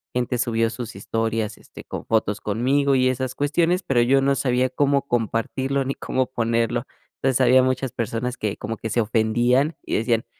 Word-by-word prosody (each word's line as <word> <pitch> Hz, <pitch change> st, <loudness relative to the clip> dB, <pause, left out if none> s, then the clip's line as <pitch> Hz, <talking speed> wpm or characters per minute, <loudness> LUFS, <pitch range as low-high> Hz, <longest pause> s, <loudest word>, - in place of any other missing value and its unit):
gente 125 Hz, 0 st, 0 dB
subió 115 Hz, -2 st, +1 dB
sus 115 Hz, -3 st, -7 dB
historias, 110 Hz, +1 st, -2 dB
este, -, -, -13 dB
con -, -, -7 dB
fotos 105 Hz, -2 st, 0 dB
conmigo 135 Hz, +6 st, +1 dB
y 130 Hz, 0 st, +3 dB
esas 130 Hz, 0 st, -2 dB
cuestiones, 170 Hz, +6 st, +1 dB
pero 130 Hz, -7 st, +2 dB
yo 135 Hz, +3 st, +4 dB
no 140 Hz, +1 st, +3 dB
sabía 130 Hz, -1 st, +1 dB
cómo 140 Hz, +2 st, +1 dB
compartirlo 120 Hz, +4 st, -1 dB
ni 135 Hz, -, -1 dB
cómo 130 Hz, 0 st, -1 dB
ponerlo, 115 Hz, 0 st, 0 dB, 0.4 s
entonces, 135 Hz, -1 st, +2 dB
había 130 Hz, 0 st, +6 dB
muchas 130 Hz, 0 st, -1 dB
personas 120 Hz, +1 st, -3 dB
que 105 Hz, -2 st, -3 dB
como 115 Hz, -, -5 dB
que 110 Hz, -, -5 dB
se 120 Hz, +2 st, +1 dB
ofendían 120 Hz, +7 st, +1 dB
y -, -, -2 dB
decían: 115 Hz, +2 st, 0 dB
125 Hz, 180 wpm, -23 LUFS, 115-135 Hz, 0.4 s, había